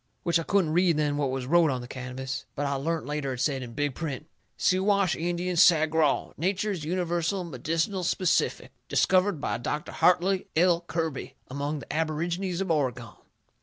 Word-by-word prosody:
Which 170 -1 +2
I - - -1
couldn't 170 -2 +1
read 175 -2 +3
then 150 -1 +1
what 145 -2 0
was 130 -1 -3
wrote 165 +3 +4
on 130 -2 -2
the 120 - -8
canvas, 130 +1 -5
but 145 - -2
I 140 - 0
learnt 160 +4 -2
later 145 -2 -2
it 125 - -7
said, 135 0 0
in 120 -2 -8
big 145 +2 -1
print: 150 -1 -5 0.3
SIWASH 190 0 +2
INDIAN 175 +1 -2
SAGRAW. 160 -3 +4
NATURE'S 190 +1 -1
UNIVERSAL 175 +2 -1
MEDICINAL 165 - -2
SPECIFIC. 180 +1 0 0.2
DISCOVERED 185 -2 +3
BY - - -2
DR. 150 +5 -2
HARTLEY 185 +2 +2
L. 170 +1 +4
KIRBY 160 -4 -3 0.2
AMONG 145 +2 -3
THE - - -7
ABORIGINES 170 +4 -2
OF 190 -3 -1
OREGON. 125 - -1
160 Hz, 165 wpm, -27 LUFS, 140-180 Hz, 0.3 s, wrote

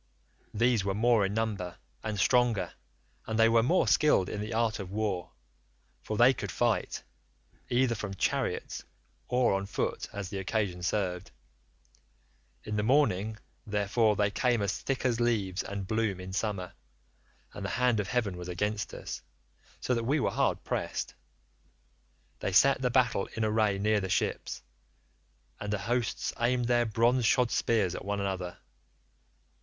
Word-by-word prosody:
These 115 -1 +3
were 95 -1 -1
more 110 -2 +3
in 100 - -4
number, 105 -6 -2 0.3
and 110 -2 -3
stronger, 115 -4 +2 0.5
and 110 - -1
they 115 0 +6
were 115 0 +5
more 165 +11 +2
skilled 150 -11 +4
in 105 - -4
the 105 +2 -5
art 115 -1 0
of 95 -2 -6
war, 100 -4 -2 0.7
for 110 - -4
they 125 +4 +7
could 100 -7 -5
fight, - - 0 0.7
either 125 0 +2
from 105 -3 -5
chariots - - -1 0.4
or 125 -3 +2
on 95 0 -1
foot - - -2
as 100 -2 -5
the 100 - -4
occasion 95 -2 -1
served; 90 -1 -1 1.3
in 105 0 -3
the - - +2
morning, 110 -4 +2 0.3
therefore, 105 +1 +2
they 105 0 +1
came 120 0 +1
as 100 - 0
thick 135 -1 -2
as 120 -2 +2
leaves 105 -6 +1
and 100 -1 -5
bloom 110 -2 0
in 95 0 -7
summer, 100 -3 -2 0.8
and - - -7
the - - -2
hand 125 -3 +3
of 100 - -1
heaven 110 -7 0
was 90 0 -7
against 105 +4 -2
us, - - -6 0.6
so 125 - 0
that 115 -1 0
we 140 +6 +1
were - - +1
hard - - 0
pressed. - - -3 1.3
They 95 - -2
set 135 +7 +5
the 125 - +2
battle 120 -6 +2
in 110 - 0
array 105 -2 +2
near 105 +1 +2
the 95 - -3
ships, 90 -2 -1 1.0
and 105 0 -4
the 105 - +1
hosts 120 +4 -1
aimed 120 +1 +2
their 120 -1 +2
bronze 120 +3 +2
shod 125 -2 +3
spears 105 -6 +1
at - - -6
one 100 0 -2
another. 95 -3 -3
105 Hz, 160 wpm, -30 LUFS, 100-120 Hz, 1.3 s, they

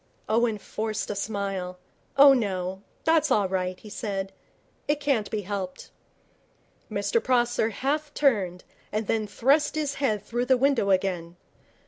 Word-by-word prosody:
Owen 225 0 +2
forced 215 +1 -3
a - - -3
smile. 195 -3 -3 0.4
'Oh, 280 0 +9
no, 190 -5 -1 0.2
that's 320 -2 +3
all 210 -6 +3
right,' 185 -1 -2
he 215 - -12
said. 195 -3 -3 0.5
'It 295 0 +1
can't 275 -8 0
be 215 - -2
helped.' 190 -2 -5 1.0
Mr 465 - 0
Prosser 240 -3 +2
half 290 +6 -2
turned, 195 -11 +1 0.3
then 215 0 -1
thrust 285 +8 +2
his 295 -2 -1
head 215 -7 +1
through 240 +3 -2
the 260 0 +5
window 270 -6 +2
again. 185 -3 0
215 Hz, 135 wpm, -26 LUFS, 195-270 Hz, 1.0 s, Oh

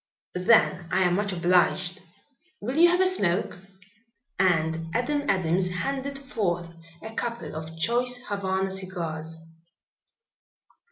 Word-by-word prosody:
"Then 180 -2 +3
I 190 - +2
am 180 -1 +2
much 200 +2 +1
obliged. 180 +1 +2 0.6
Will 250 +5 -4
you 340 +2 +7
have 355 +1 +3
a - - +5
smoke?" 190 - +1 0.8
and 165 -3 +1
Adam 285 +4 0
Adams 180 -1 +2
handed 275 +9 -3
forth 180 -11 -2 0.3
a 220 0 -7
couple 235 -6 -4
of 160 +1 -7
choice 245 +8 +1
Havana 190 -1 -1
cigars. 165 -4 -4
190 Hz, 115 wpm, -26 LUFS, 175-235 Hz, 0.8 s, you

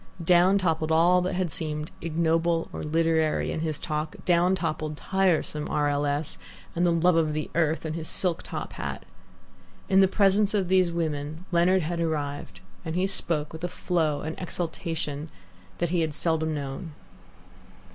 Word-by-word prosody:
Down 180 +3 +5
toppled 160 -4 0
all 175 +3 +5
that 180 0 -2
had 180 -3 -1
seemed 150 0 -3
ignoble 165 +1 +1
or - - -5
literary 160 0 +1
in - - -3
his 155 -2 -1
talk, 155 0 -3
down 180 +1 +3
toppled 155 -3 -3
tiresome 175 -6 0
R. 150 -1 +1
L. 145 0 0
S. 145 +1 -2 0.4
and 170 - +1
the - - +3
"love 170 +1 +3
of 160 -2 +2
the 155 0 -3
earth" 160 -1 +1
and 155 - -2
his 160 -1 -4
silk 180 -3 +1
top - - -6
hat. - - -5 0.8
In 190 - +5
the 190 - +6
presence 200 +1 +3
of 190 -3 0
these 185 -2 +4
women 160 0 -3
Leonard 175 +1 +3
had 170 +2 -2
arrived, 150 -3 -3 0.2
and 160 -1 -4
he 185 +1 +2
spoke 165 -6 0
with 160 +1 -9
a - - +1
flow, 165 -4 -1
an 160 +1 -4
exultation, 165 -4 -4 0.5
that 175 -1 -1
he 175 -2 +2
had 155 -2 -1
seldom 160 0 0
known. 145 +4 -5
165 Hz, 170 wpm, -26 LUFS, 155-180 Hz, 0.8 s, the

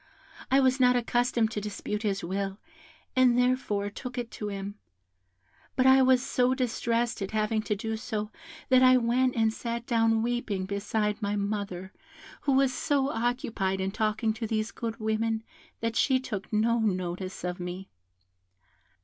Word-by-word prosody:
I 270 - +5
was 260 0 +3
not 250 -1 +5
accustomed 240 -1 +1
to 210 - -3
dispute 210 0 -4
his 200 -3 -1
will, 195 +2 -2 0.6
and 255 -2 +5
therefore 245 -5 +1
took 250 +4 -7
it 240 -1 -3
to 210 - -5
him; 200 0 -5 1.0
but 255 - +2
I 265 0 +7
was 260 0 +4
so 250 +1 +2
distressed 235 -2 -1
at 195 - -2
having 215 0 0
to 210 -1 -1
do 220 +2 -3
so 215 -2 -4 0.4
that 255 -1 +6
I 255 0 +7
went 250 +2 +2
and 225 -1 +2
sat 235 0 -4
down 225 -2 +2
weeping 235 -5 -1
beside 210 +2 -1
my 205 0 -1
mother, 200 -2 -3 0.5
who 280 - +1
was 265 -1 +3
so 280 0 +1
occupied 225 -5 -1
in 190 0 -1
talking 220 +1 0
to 225 0 -4
these 215 0 -1
good 230 -1 -5
women 220 +1 0 0.4
that 230 0 -1
she 260 0 +3
took 210 -7 -6
no 230 +2 +2
notice 185 -3 -2
of 180 +1 -3
me. 180 +2 -6
225 Hz, 160 wpm, -28 LUFS, 205-245 Hz, 1.0 s, I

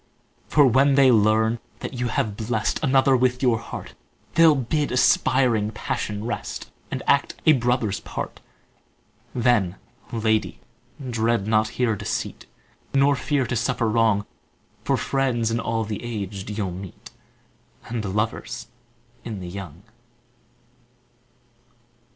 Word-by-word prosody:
For 145 -2 +5
when 135 +3 +4
they 135 -2 +6
learn 110 +1 +3 0.2
that - - -5
you 125 -1 -2
have 110 -2 -1
blest 110 0 -1
Another 135 -1 +4
with 125 +1 +1
your 120 -3 +3
heart, 115 - -8 0.4
They'll 165 -2 +6
bid 145 +3 -1
aspiring 125 -3 +3
passion 105 0 -4
rest, 120 - -5 0.2
And - - -4
act - - +2
a 155 - +7
brother's 120 -5 0
part; - - -6 1.0
Then, 115 -7 +2 0.4
lady, 110 -2 0 0.5
dread 115 -3 0
not 110 0 +2
here 120 -4 +2
deceit, - - -4 0.5
Nor 140 +1 +4
fear 140 0 0
to 125 - -2
suffer 115 0 0
wrong; 110 -2 +2 0.6
For - - +1
friends 125 -4 0
in 115 - 0
all 115 0 -1
the 105 -2 -5
aged 100 -4 -5
you'll 105 -3 -2
meet, 90 0 -9 0.7
And 115 -2 -4
lovers 105 +3 -3 0.5
in 110 -4 -5
the 90 -1 -7
young. 90 -2 -8
115 Hz, 125 wpm, -24 LUFS, 105-125 Hz, 1.0 s, a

